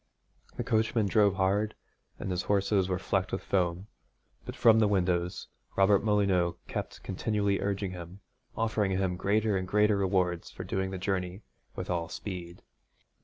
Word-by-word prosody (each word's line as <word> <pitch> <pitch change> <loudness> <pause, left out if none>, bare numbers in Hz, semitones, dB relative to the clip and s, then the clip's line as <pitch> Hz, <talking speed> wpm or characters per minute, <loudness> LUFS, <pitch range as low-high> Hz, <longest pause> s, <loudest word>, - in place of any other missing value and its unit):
The - - -1
coachman 110 0 +1
drove 100 -1 +3
hard 100 +3 +1 0.4
and 95 - -4
his 90 0 0
horses 100 -1 +2
were 90 - 0
flecked - - -1
with - - -3
foam, 90 -1 0 0.6
but - - -6
from 110 -1 +6
the 110 - +4
windows 90 -3 0 0.3
Robert 100 +1 +4
Molyneux 100 -5 +2
kept - - -5
continually 100 +1 0
urging 100 -1 -1
him, 90 +2 -9 0.4
offering 110 -3 +1
him 95 -1 0
greater 105 +3 +1
and 95 -1 -2
greater 105 +1 +3
rewards 90 -3 0
for - - -8
his - - -12
doing 95 0 0
the 95 - -4
journey 95 +1 -2 0.3
with - - -4
all 85 -1 -1
speed. 90 -3 -7
95 Hz, 160 wpm, -29 LUFS, 90-105 Hz, 0.6 s, from